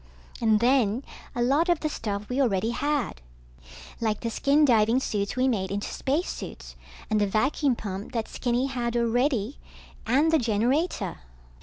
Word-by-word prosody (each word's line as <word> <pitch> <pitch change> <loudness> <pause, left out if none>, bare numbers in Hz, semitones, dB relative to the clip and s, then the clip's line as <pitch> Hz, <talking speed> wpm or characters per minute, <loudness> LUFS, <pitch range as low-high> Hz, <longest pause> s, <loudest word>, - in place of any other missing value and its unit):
And 220 -2 +4
then, 245 -1 +3 0.3
a 240 - +1
lot 290 +8 +2
of 345 -3 +2
the 310 - 0
stuff 210 -7 -4
we 255 +3 0
already 220 -3 +1
had. 280 - -1 0.8
Like 220 -2 -1
the 230 - -2
skin 285 +5 +3
diving 230 -1 +4
suits 205 -5 -2
we 255 +1 +2
made 195 -7 0
into 205 +1 -3
spacesuits 295 +7 -3 0.4
and 215 -1 +2
the 205 - +3
vacuum 260 +6 +1
pump 200 -1 -6
that 225 -2 -2
Skinny 245 +1 -1
had 240 -3 -2
already 240 +1 0 0.5
and 285 +7 +3
the 320 - +4
generator. 235 - 0
240 Hz, 155 wpm, -26 LUFS, 215-275 Hz, 0.8 s, And